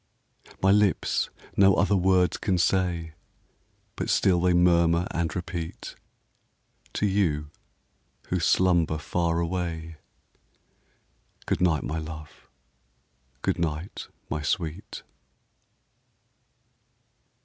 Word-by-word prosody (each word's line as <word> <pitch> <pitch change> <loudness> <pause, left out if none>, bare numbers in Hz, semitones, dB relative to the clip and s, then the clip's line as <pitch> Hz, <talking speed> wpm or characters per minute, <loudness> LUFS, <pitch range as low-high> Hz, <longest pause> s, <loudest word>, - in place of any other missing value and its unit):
My 95 - +5
lips 105 -1 +2 0.3
no 95 -1 +5
other 100 - +2
words 90 -1 +3
can 95 -3 0
say, 85 -3 0 0.8
But - - -3
still 90 -3 +3
they 90 0 +3
murmur 85 -1 +4
and 85 -3 -2
repeat 85 -1 -5 1.0
To - - 0
you, 80 -7 0 0.8
who 90 - 0
slumber 85 -2 +2
far 85 +2 -1
away, 85 -2 -3 1.5
Good - - -1
night, 80 -5 +2
my 80 +2 -3
love! 80 -2 -9 1.0
good 95 -2 0
night, 80 +2 -3 0.2
my 75 - -3
sweet! 80 +4 -3
85 Hz, 95 wpm, -26 LUFS, 80-90 Hz, 1.5 s, My